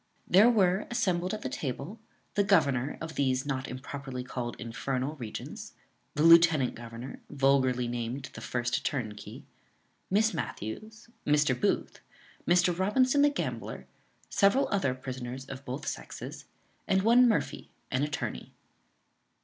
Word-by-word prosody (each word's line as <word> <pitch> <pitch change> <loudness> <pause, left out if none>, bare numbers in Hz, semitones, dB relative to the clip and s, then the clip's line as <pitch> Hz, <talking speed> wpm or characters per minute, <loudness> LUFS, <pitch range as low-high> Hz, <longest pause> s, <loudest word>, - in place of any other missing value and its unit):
There 205 +6 +7
were 195 -4 +2
assembled 185 -7 0
at 215 - -4
the - - -1
table 140 - -5 0.3
the 205 - +3
governor 145 -9 +2
of 160 0 -6
these 130 -2 +1
(not 135 -2 -2
improperly 130 0 -6
called 125 -1 -4
infernal) 130 +4 -3
regions; 115 -5 -7 0.4
the 150 - +1
lieutenant 165 -5 +6
governor, 115 +2 -8
vulgarly 135 -3 +2
named 120 +3 -4
the - - -9
first 120 -1 -1
turnkey; 110 -7 -4 0.7
Miss 215 +3 +3
Matthews, 205 - -6 0.2
Mr. 150 -2 +3
Booth, 125 - -1 0.5
Mr. 175 0 +4
Robinson 255 +9 +3
the 290 - +6
gambler, 285 - -4 0.4
several 205 +7 +3
other 140 -11 +1
prisoners 130 0 -6
of 135 0 -9
both 135 +3 -5
sexes, - - -6 0.4
and 190 0 +2
one 240 +3 +6
Murphy, 220 - -1 0.2
an 130 - +1
attorney. 150 - -3
140 Hz, 130 wpm, -29 LUFS, 125-190 Hz, 0.7 s, There